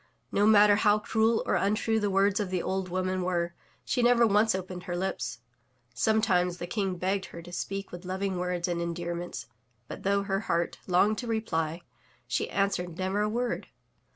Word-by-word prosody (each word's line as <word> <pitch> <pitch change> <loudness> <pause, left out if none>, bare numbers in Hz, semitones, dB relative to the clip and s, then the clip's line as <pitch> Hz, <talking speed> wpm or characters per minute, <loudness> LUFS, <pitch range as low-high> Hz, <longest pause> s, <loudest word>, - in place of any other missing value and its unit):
No 205 +1 +3
matter 205 -1 +7
how 210 0 +4
cruel 220 +1 +1
or - - 0
tmtrue 215 +2 +1
the 205 - +1
words 195 +1 +3
of 205 -3 -1
the 180 -1 -1
old 190 -1 -2
woman 185 +1 -1
were, 175 -1 -1 0.3
she 250 - 0
never 240 0 +5
once 210 0 +3
opened 185 -1 -5
her 175 -1 -3
lips. 130 -11 -3 0.5
Sometimes 180 - +2
the 175 - -5
King 190 0 -1
begged 190 +2 -1
her 170 - -10
to 175 - -11
speak 195 +2 -4
with 175 +1 -8
loving 190 0 -2
words 180 -1 -1
and 170 -1 -1
endearments, 170 -1 -4 0.4
but, - - -8
though 200 +1 +1
her 195 -1 -1
heart 170 0 0
longed 195 +4 +3
to 245 - -5
reply, 170 -7 -1 0.4
she - - -1
answered 180 -4 -1
never 190 +2 0
a 210 - +1
word. 240 +2 -2
190 Hz, 180 wpm, -28 LUFS, 175-210 Hz, 0.5 s, matter